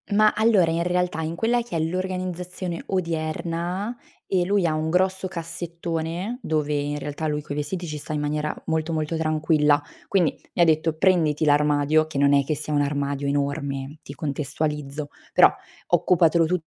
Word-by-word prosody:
Ma, 215 Hz, +1 st, +5 dB
allora 215 Hz, -7 st, +4 dB
in 165 Hz, +1 st, 0 dB
realtà 180 Hz, -2 st, 0 dB
in 160 Hz, +1 st, -3 dB
quella 235 Hz, +6 st, +1 dB
che 230 Hz, -7 st, -4 dB
è -, -, 0 dB
l'organizzazione 180 Hz, 0 st, -3 dB
odierna 170 Hz, +4 st, -2 dB, 0.3 s
e 185 Hz, -2 st, +2 dB
lui 200 Hz, -1 st, +2 dB
ha 160 Hz, -, +2 dB
un 155 Hz, +1 st, -1 dB
grosso 190 Hz, +2 st, +1 dB
cassettone, 170 Hz, +4 st, -4 dB
dove 150 Hz, -, -1 dB
in 145 Hz, 0 st, -1 dB
realtà 145 Hz, +2 st, -4 dB
lui 150 Hz, 0 st, -1 dB
coi 145 Hz, -, -6 dB
vestiti 160 Hz, +5 st, -3 dB
ci 150 Hz, -1 st, -4 dB
sta 150 Hz, -, -7 dB
in 150 Hz, -, -1 dB
maniera 150 Hz, +1 st, -1 dB
molto 160 Hz, 0 st, -1 dB
molto 155 Hz, +1 st, -1 dB
tranquilla. 155 Hz, -2 st, +2 dB, 0.3 s
Quindi 175 Hz, -6 st, +2 dB, 0.2 s
mi -, -, +2 dB
ha -, -, +7 dB
detto: 160 Hz, 0 st, +2 dB
"Prenditi 160 Hz, -4 st, +3 dB
l'armadio," 150 Hz, +1 st, +3 dB
che 155 Hz, -, -6 dB
non 140 Hz, 0 st, +4 dB
è 140 Hz, 0 st, +5 dB
che 155 Hz, +3 st, -1 dB
sia 150 Hz, +1 st, -3 dB
un 145 Hz, -, +3 dB
armadio 140 Hz, 0 st, -1 dB
enorme, 140 Hz, 0 st, -2 dB
ti 140 Hz, -, -9 dB
contestualizzo, 150 Hz, 0 st, -3 dB, 0.2 s
"Però -, -, +8 dB, 0.4 s
occupatelo 170 Hz, -1 st, +4 dB
tutto 170 Hz, 0 st, -1 dB
160 Hz, 170 wpm, -24 LUFS, 150-180 Hz, 0.4 s, Però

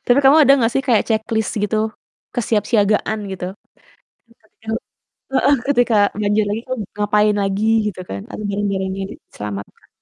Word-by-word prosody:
Tapi 245 Hz, +2 st, +4 dB
kamu 275 Hz, +2 st, +7 dB
ada 275 Hz, -, +6 dB
gak 230 Hz, +1 st, +2 dB
sih 270 Hz, -, +1 dB
kayak, 235 Hz, -5 st, +4 dB
checklist 220 Hz, 0 st, 0 dB
gitu, 210 Hz, +1 st, 0 dB, 0.6 s
kesiapsiagaan 215 Hz, -2 st, +1 dB
gitu? 180 Hz, -1 st, -5 dB, 0.9 s
Tadi 220 Hz, -2 st, -29 dB
kan 220 Hz, -, -3 dB, 0.6 s
heeh, 280 Hz, +1 st, +4 dB
ketika 245 Hz, -5 st, +3 dB, 0.2 s
banjir 210 Hz, +1 st, +2 dB
lagi 210 Hz, +2 st, -2 dB
kamu 255 Hz, -4 st, -3 dB
ngapain 210 Hz, 0 st, +2 dB
lagi 195 Hz, +2 st, -1 dB, 0.2 s
gitu 200 Hz, -3 st, -5 dB
kan 100 Hz, 0 st, -5 dB
atau 215 Hz, -, -6 dB
barang-barangnya 195 Hz, -1 st, -2 dB
diselamatkan. 100 Hz, -, -9 dB
215 Hz, 145 wpm, -19 LUFS, 200-230 Hz, 0.9 s, kamu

